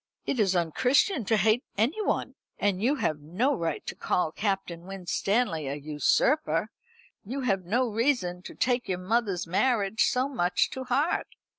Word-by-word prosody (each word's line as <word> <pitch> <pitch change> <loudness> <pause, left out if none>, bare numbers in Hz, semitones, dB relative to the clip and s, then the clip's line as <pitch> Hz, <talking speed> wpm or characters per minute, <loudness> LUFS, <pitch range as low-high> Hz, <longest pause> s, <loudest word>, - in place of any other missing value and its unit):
"It 260 - -1
is 195 -3 +3
unchristian 250 - +2
to 220 +2 +2
hate 220 +5 +3
anyone. 290 - 0 0.2
And 200 -2 0
you 260 +7 +2
have 155 - -1
no 185 - 0
right 165 -5 -3
to - - -4
call 170 -3 0
Captain 190 -3 -3
Winstanley 195 - -1
a 140 - -2
usurper. 155 - +1 0.5
You 260 +7 -4
have 195 -7 0
no 245 +8 +1
reason 220 -6 0
to - - -9
take 245 -2 0
your 185 - 0
mother's 195 -1 0
marriage 205 +3 +2
so 255 +1 +1
much 185 -10 +1
to 260 0 -5
heart. 275 +7 +1
210 Hz, 155 wpm, -27 LUFS, 180-250 Hz, 0.5 s, is